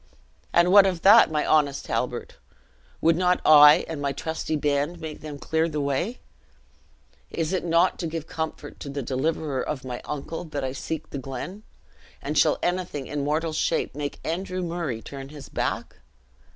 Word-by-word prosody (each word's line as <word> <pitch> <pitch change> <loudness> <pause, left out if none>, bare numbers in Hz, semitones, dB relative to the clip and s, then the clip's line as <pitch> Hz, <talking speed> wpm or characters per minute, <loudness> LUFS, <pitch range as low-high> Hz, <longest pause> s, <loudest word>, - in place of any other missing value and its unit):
"And 175 +1 +4
what 200 0 +8
of 180 -3 -2
that, 210 +4 +8
my 150 -1 0
honest 145 -3 +2
Halbert? - - -3 0.6
would 165 0 +4
not 180 +1 +2
I 150 -1 +8
and 155 -3 -5
my 140 -1 -1
trusty 160 +2 -3
band 145 +3 0
make 160 -2 -7
them 150 -2 -7
clear 160 +3 0
the 150 -1 -3
way? 140 - -2 1.1
Is 165 +2 -2
it 185 - 0
not 170 +2 +2
to 170 - -2
give 160 -1 -5
comfort 160 -1 -6
to 140 - -7
the 140 0 -4
deliverer 140 +1 -1
of 135 -2 -4
my 125 -1 -5
uncle, 150 +3 -5
that 145 -3 -4
I 130 - -2
seek 145 +4 -5
the 140 - -4
glen? 135 - -6 0.6
and - - -4
shall - - +4
anything 175 -6 -2
in 145 0 -3
mortal 155 +2 -1
shape - - 0
make 145 0 -5
Andrew 185 +2 -3
Murray 165 -9 -3
turn 135 -1 -8
his 145 -2 -11
back? - - -3
155 Hz, 175 wpm, -25 LUFS, 140-170 Hz, 1.1 s, what